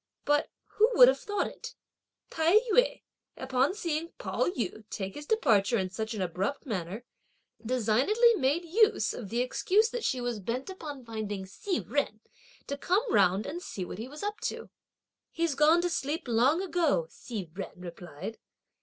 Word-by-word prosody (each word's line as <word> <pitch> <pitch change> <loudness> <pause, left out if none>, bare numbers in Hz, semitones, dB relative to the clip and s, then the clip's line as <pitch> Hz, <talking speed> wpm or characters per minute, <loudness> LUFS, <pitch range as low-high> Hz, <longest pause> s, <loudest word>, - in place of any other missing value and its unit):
But, 295 0 +2 0.2
who 440 +2 +3
would - - +10
have - - +1
thought 410 -1 -1
it, - - -8 0.6
Tai 325 +4 +3 0.2
yü, - - +3 0.3
upon 260 +6 +1
seeing 335 -4 -3
Pao - - -1
yü 225 - -3
take 195 -1 -4
his 295 0 -9
departure 235 - +3
in 185 -2 -2
such 220 +3 -4
an 195 - -1
abrupt 185 - -2
manner, 205 - -4 0.6
designedly 255 - +3
made 300 -1 +1
use 430 +6 +3
of 210 -6 -7
the 235 +3 0
excuse 400 - +2
that 485 -2 -4
she 260 - 0
was 245 -3 -2
bent 245 - -3
upon 295 -8 -8
finding 210 -4 -4
Hsi 345 - -3
Jen, 280 -7 -2 0.5
to 280 - -4
come 405 - +1
round 195 +1 +4
and 345 +4 -5
see 190 - -5
what 185 - -8
he 230 - -5
was 295 +6 -9
up 415 +1 -3
to. - - -4 0.6
"He's 335 -2 0
gone 310 +5 +4
to 355 - +1
sleep 300 +1 -2
long 255 +10 +3
ago!" 330 - +1
Hsi 215 -6 -6
Jen 195 - -6
replied. 175 +3 -8
265 Hz, 170 wpm, -29 LUFS, 215-345 Hz, 0.6 s, would